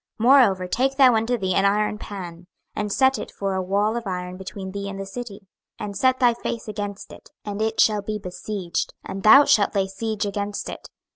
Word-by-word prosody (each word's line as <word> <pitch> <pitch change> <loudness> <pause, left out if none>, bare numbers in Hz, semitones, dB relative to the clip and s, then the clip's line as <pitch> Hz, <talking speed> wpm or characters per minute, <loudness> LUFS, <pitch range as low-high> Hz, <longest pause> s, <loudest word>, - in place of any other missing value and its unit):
26:004:003 230 - +1
Moreover 195 -10 +5
take 265 +8 0
thou 265 -3 +6
unto 225 +2 +1
thee 190 -3 -1
an 195 - +2
iron 210 +1 +1
pan, 175 -5 -8 0.3
and 210 -1 -2
set 265 +4 +3
it - - -6
for 195 -1 -3
a 190 - -1
wall 200 +4 0
of 235 -3 -4
iron 180 -1 -4
between 190 0 -7
thee 200 0 -5
and 195 0 -7
the 195 - -4
city: 210 0 -8 0.4
and 200 -1 -6
set 260 +5 +2
thy 245 -2 +4
face 230 0 -5
against 205 -1 -6
it, - - -15 0.2
and 205 0 -4
it 220 0 -1
shall 210 -1 +4
be 215 +1 -4
besieged, 185 -1 -4
and 195 - -6
thou 275 +8 +8
shalt 205 0 +3
lay 195 -1 +2
siege 210 +2 -3
against 205 0 -3
it. - - -9
205 Hz, 215 wpm, -23 LUFS, 195-225 Hz, 0.4 s, thou